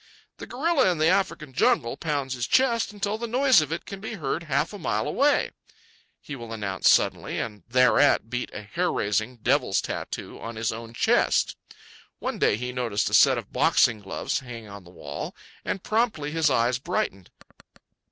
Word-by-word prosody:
"The - - -9
gorilla 275 - +2
in 175 - -2
the 155 +1 +3
African 180 -7 0
jungle 115 -1 +2
pounds 145 -4 -2
his 120 -2 -3
chest 235 -5 +2
until 205 +1 -3
the 235 - -3
noise 255 - +4
of 155 0 -4
it 165 - -4
can 195 - -8
be 220 +2 -6
heard 155 -2 -2
half - - 0
a 205 - -7
mile 110 - -1
away," 285 +1 +2 0.7
he 145 - -8
will 115 -3 -9
announce 100 -4 +1
suddenly, - - +2
and 105 -3 -4
thereat 125 -1 +4
beat 125 +2 -3
a 105 - -7
hair 175 - -1
raising, 110 +4 -1
devil's 120 -3 +1
tattoo - - -5
on 115 0 -7
his 110 +1 -1
own 115 +1 -8
chest. - - +2 0.6
One - - -4
day 100 - +3
he 125 +2 -4
noticed 120 -5 -1
a - - -7
set - - +6
of - - -7
boxing 115 -3 +3
gloves 95 -1 -3
hanging 115 -5 -9
on 100 -2 -11
the - - -14
wall, 70 -5 -7 0.3
and 195 - -3
promptly 215 -10 0
his 160 -1 +2
eyes 120 -1 +1
brightened. 95 -7 -3
130 Hz, 180 wpm, -25 LUFS, -, 0.7 s, set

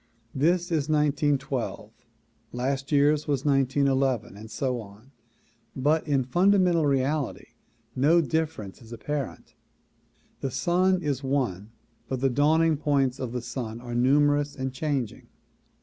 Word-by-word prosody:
This 175 +5 +1
is 155 -2 0
1912, 145 -7 0 0.6
last 135 +3 -2
year's 145 +1 +3
was 140 -2 -1
1911 135 -4 +1
and 110 +2 -11
so 125 +3 -2
on, 105 +5 -15 0.6
but 150 +4 +1
in 140 -3 +2
fundamental 175 +2 +3
reality 140 0 -1 0.5
no 150 +6 +4
difference 160 - -2
is 115 -1 -15
apparent. 140 +4 -5 0.9
The 135 - -2
sun 180 +7 +1
is 140 -3 -1
one 125 -8 -1 0.4
but 130 - -3
the 135 0 +1
dawning 155 +4 +3
points 140 -3 +1
of 130 -3 -4
the 125 -1 -4
sun 120 -2 -5
are 120 0 -7
numerous 145 +3 +2
and 130 -1 -4
changing. 135 -5 -3
140 Hz, 125 wpm, -26 LUFS, 125-150 Hz, 0.9 s, no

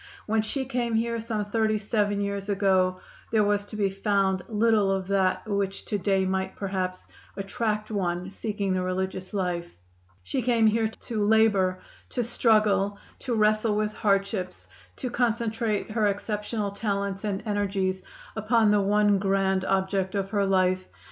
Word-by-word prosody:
When 220 0 +2
she 265 +5 -3
came 240 -3 -1
here, 230 +1 0
some 220 -2 -2
thirty 215 +1 +1
seven 205 -1 0
years 200 0 -3
ago, 190 -2 +2 0.3
there 220 -2 +4
was 205 0 +1
to 215 - -9
be 200 -2 +1
found 195 -1 +1
little 215 -2 +3
of 190 -1 -1
that 195 +2 +1
which 200 -2 -2
to 205 - -2
day 195 0 +1
might, 190 0 -1
perhaps, 185 -2 -3 0.3
attract 215 +2 -2
one 180 -2 -2
seeking 200 -1 -2
the 185 - 0
religious 185 0 -3
life. 180 -4 -2 0.5
She 255 - -2
came 235 -2 +3
here 220 +1 +3
to 220 0 -4
labor, 205 -4 +3 0.3
to 245 - -1
struggle, 215 -3 +2 0.2
to 245 -3 -2
wrestle 215 0 +2
with 210 0 0
hardships, 195 -3 -1 0.3
to 250 - -4
concentrate 230 -3 0
her 215 -1 +2
exceptional 210 +1 -2
talents 200 -1 -2
and 200 -2 -2
energies 195 -3 -1 0.3
upon 220 0 +3
the 205 -1 +4
one 205 0 +3
grand 195 -1 +1
object 190 0 0
of 195 -1 -2
her 200 -2 +1
life. 185 -1 +2
205 Hz, 155 wpm, -26 LUFS, 195-220 Hz, 0.5 s, there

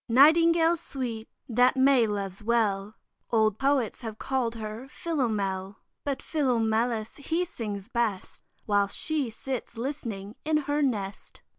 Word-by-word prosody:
Nightingale 330 +6 +6
sweet, 240 -7 -5 0.2
that 250 +3 +3
May 260 -3 +5
loves 200 -1 -3
well, 215 -3 +1 0.3
Old 220 -2 +2
Poets 270 -4 +1
have 220 -2 -6
call'd 245 -3 -1
her 220 +3 -6
Philomel, 205 - -2 0.3
But 275 -2 -2
Philomelus, 230 -5 0
he 330 +5 -1
sings 210 - -5
best, 235 -6 -2 0.2
While 205 -1 +3
she 295 +3 -1
sits 245 +1 -5
listening 230 -6 -5
in 310 0 +2
her 290 +1 +1
nest. 205 -8 -2
235 Hz, 125 wpm, -28 LUFS, 215-275 Hz, 0.3 s, Nightingale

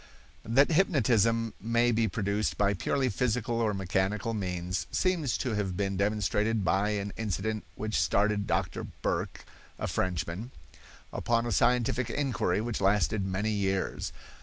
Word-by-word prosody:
That 135 +8 +4
hypnotism 115 - +3
may 115 +2 +2
be 115 0 +2
produced 105 +1 -1
by 100 0 +3
purely 130 +7 0
physical 120 0 0
or 110 -2 +2
mechanical 95 +3 -1
means 90 -3 -2
seems 170 - +1
to 125 - -2
have 100 -4 -2
been 100 -1 -1
demonstrated 105 +1 +1
by 95 +3 +2
an 100 0 -4
incident 110 0 -2
which 110 +1 -1
started 105 0 +1
Doctor - - -1 0.2
Burq, - - -2 0.3
a - - -3
Frenchman, 90 +5 -2 0.6
upon 115 0 +1
a 120 - -2
scientific 120 +2 +2
inquiry 120 -9 0
which 115 0 -3
lasted 100 +1 +2
many 95 +3 -1
years. 95 -2 -1
105 Hz, 135 wpm, -29 LUFS, 100-115 Hz, 0.6 s, That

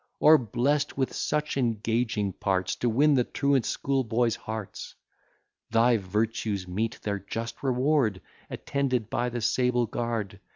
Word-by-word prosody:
Or 155 0 +7
blest 135 +6 0
with 135 -1 0
such 150 -1 -1
engaging 115 -4 0
parts 95 0 -1
To 120 - 0
win 145 +6 +4
the 130 -3 +3
truant 140 -2 +1
schoolboys' 120 -4 0
hearts! 110 -2 -7 0.7
Thy 115 +1 +4
virtues 105 0 -2
meet 110 +6 -2
their 100 -1 -2
just 115 +4 -6
reward, 130 -5 +1 0.3
Attended 130 -6 -2
by 125 +1 0
the 120 0 -4
sable 125 +1 +2
guard. 115 -4 -3
115 Hz, 130 wpm, -27 LUFS, 110-130 Hz, 0.7 s, Or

